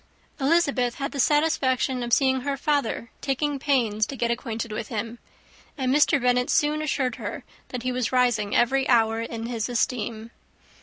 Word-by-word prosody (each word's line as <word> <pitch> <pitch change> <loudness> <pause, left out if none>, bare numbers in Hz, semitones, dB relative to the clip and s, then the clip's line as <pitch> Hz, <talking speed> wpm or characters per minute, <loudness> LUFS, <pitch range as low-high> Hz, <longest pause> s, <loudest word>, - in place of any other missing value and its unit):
Elizabeth 275 -5 +2
had 275 0 -4
the 280 - -6
satisfaction 270 -3 +2
of 240 0 -4
seeing 260 0 +3
her 280 +1 -2
father 280 -5 -1
taking 280 +1 -1
pains 230 -7 +1
to 275 - -6
get 235 -2 0
acquainted 230 -2 -4
with 215 +1 -4
him; 230 +1 -5 0.6
and 260 -2 0
Mr. 290 0 +4
Bennet 250 0 +1
soon 300 +1 +2
assured 265 -5 -1
her - - -6 0.2
that 250 -2 -6
he 255 - -1
was 250 -1 -1
rising 240 -5 +1
every 265 +3 +2
hour 225 -2 +3
in 230 0 -5
his 230 -1 -3
esteem. 230 -2 -2
250 Hz, 165 wpm, -25 LUFS, 230-275 Hz, 0.6 s, Mr